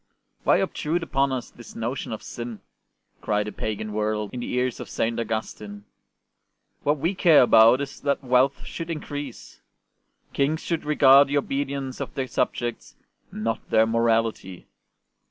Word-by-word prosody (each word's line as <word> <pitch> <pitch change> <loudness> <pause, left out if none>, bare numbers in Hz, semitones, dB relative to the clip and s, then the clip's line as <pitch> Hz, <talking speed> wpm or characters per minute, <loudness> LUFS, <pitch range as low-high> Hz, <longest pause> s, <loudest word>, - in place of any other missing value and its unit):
'' - - -44
Why - - +5
obtrude 165 +3 -1
upon 135 -3 +1
us 130 -2 -4
this 120 - -13
notion 120 +4 -4
of 110 - -6
sin 120 -2 -7 0.3
?" - - -45
cried 105 0 0
the 105 - -5
pagan 110 0 -4
world 105 -1 -1
in 125 - -4
the 120 - -5
ears 125 -1 -1
of - - -7
St. 115 +1 -1
Augustine. 105 -2 -5 0.5
'' - - -51
What 145 +1 +2
we 170 +7 0
care 165 -7 +6
about 115 +2 +6
is 140 0 -6
that 140 0 -1
wealth 130 +2 +2
should 165 0 -6
increase. 145 -5 -7 0.7
Kings 150 +3 0
should 165 -3 -2
regard 140 -2 +6
the 145 +1 0
obedience 135 -1 -3
of - - -6
their 135 - -1
subjects, 120 -1 -3 0.4
not 115 +1 -3
their 110 - +4
morality. 115 -4 0
125 Hz, 160 wpm, -24 LUFS, 110-140 Hz, 0.7 s, care